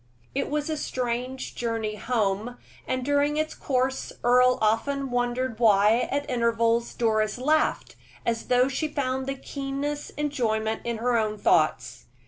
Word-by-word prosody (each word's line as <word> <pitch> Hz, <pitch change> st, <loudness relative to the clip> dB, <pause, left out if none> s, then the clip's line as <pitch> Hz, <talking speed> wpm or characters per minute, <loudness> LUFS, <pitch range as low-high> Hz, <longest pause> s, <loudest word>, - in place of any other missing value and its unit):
It 275 Hz, +1 st, -1 dB
was 295 Hz, 0 st, -1 dB
a 315 Hz, -1 st, -2 dB
strange 255 Hz, -1 st, -3 dB
journey 225 Hz, -2 st, -2 dB
home, 215 Hz, +1 st, -1 dB, 0.3 s
and 255 Hz, -1 st, -1 dB
during 290 Hz, +1 st, +2 dB
its 310 Hz, 0 st, -1 dB
course 260 Hz, 0 st, -1 dB
Earle 250 Hz, +1 st, +5 dB
often 265 Hz, +5 st, 0 dB
wondered 245 Hz, -1 st, -1 dB
why, 215 Hz, +1 st, +4 dB
at 285 Hz, +1 st, -1 dB
intervals, 235 Hz, -1 st, +1 dB
Doris 215 Hz, -2 st, +1 dB
laughed, 305 Hz, +5 st, +1 dB, 0.3 s
as 230 Hz, -1 st, -1 dB
though 250 Hz, +1 st, +4 dB
she 275 Hz, +4 st, -1 dB
found 265 Hz, -2 st, -2 dB
the 275 Hz, -, -2 dB
keenest 280 Hz, +2 st, -4 dB
enjoyment 225 Hz, -7 st, -1 dB
in 235 Hz, -1 st, -2 dB
her 240 Hz, +1 st, +1 dB
own 215 Hz, -1 st, -1 dB
thoughts. 125 Hz, -, +1 dB
245 Hz, 140 wpm, -26 LUFS, 225-275 Hz, 0.3 s, Earle